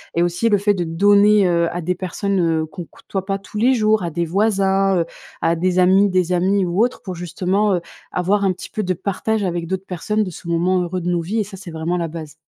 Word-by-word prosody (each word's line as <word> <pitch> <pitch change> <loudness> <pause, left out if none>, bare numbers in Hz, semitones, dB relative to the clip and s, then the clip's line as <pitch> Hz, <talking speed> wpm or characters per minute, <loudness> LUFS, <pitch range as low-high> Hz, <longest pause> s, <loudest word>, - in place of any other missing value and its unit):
et 170 - +2
aussi 175 +6 +1
le 205 - +3
fait 205 +1 +2
de 180 - -1
donner, 200 +4 +4
heu, 170 -1 +2
à 175 - -3
des 180 +2 -1
personnes, 190 +2 -2
heu, 165 -2 +1
qu'on 175 +2 -8
côtoie 190 +3 -6
pas 195 0 -2
tous 195 - -10
les 245 +5 +4
jours, 215 -4 +2
à 170 - -3
des 170 +2 -1
voisins, 195 0 +2
heu, 165 - +1 0.4
à 165 - +2
des 180 +2 +1
amis, 190 +3 +5
des 185 -2 +1
amis 190 +2 +2
ou 180 +5 +1
autres 250 - -5
pour 185 -2 -6
justement, 185 +4 0
heu, 175 - 0 0.3
avoir 195 +3 +1
un 190 - +3
petit 180 - -10
peu 215 - -3
de 185 -1 0
partage 200 +4 -2
avec 175 -2 -2
d'autres 190 +2 -4
personnes 210 +4 -1
de 195 - -4
ce 170 0 -11
moment 175 +2 +1
heureux 180 +1 -3
de 175 - -2
nos 175 -1 +1
vies 200 +7 -2
et - - +2
ça 200 -1 -10
c'est 185 -2 -9
vraiment 165 +2 -2
la 170 -1 -1
base. 155 -2 -8
185 Hz, 255 wpm, -20 LUFS, 175-200 Hz, 0.4 s, amis